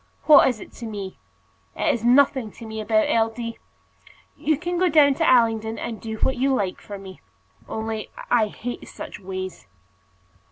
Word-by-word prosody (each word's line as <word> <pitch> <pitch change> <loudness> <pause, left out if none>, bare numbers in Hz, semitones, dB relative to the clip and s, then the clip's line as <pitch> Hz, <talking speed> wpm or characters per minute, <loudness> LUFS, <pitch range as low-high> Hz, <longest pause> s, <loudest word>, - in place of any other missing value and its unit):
What 300 -3 +8
is 250 -4 -1
it - - -11
to 230 - -4
me? 200 -3 -6 0.6
It - - +1
is 230 - -4
nothing 260 -1 +4
to 230 - -11
me 220 0 -5
about 215 0 +2
L. 225 -1 +2
D. 230 0 -6 0.8
You 310 0 0
can 350 +2 -3
go 365 0 +3
down 295 -3 +6
to 325 +4 +1
Allington 225 -2 +3
and 225 -2 -5
do 220 -1 -5
what 265 - 0
you 270 +2 +2
like 195 -6 -2
for 205 - -8
me. 190 -1 -11 0.5
Only 220 -1 -4 0.2
I 230 -3 +4
hate 240 +3 -7
such - - -8
ways." 185 - -6
225 Hz, 175 wpm, -23 LUFS, 215-265 Hz, 0.8 s, What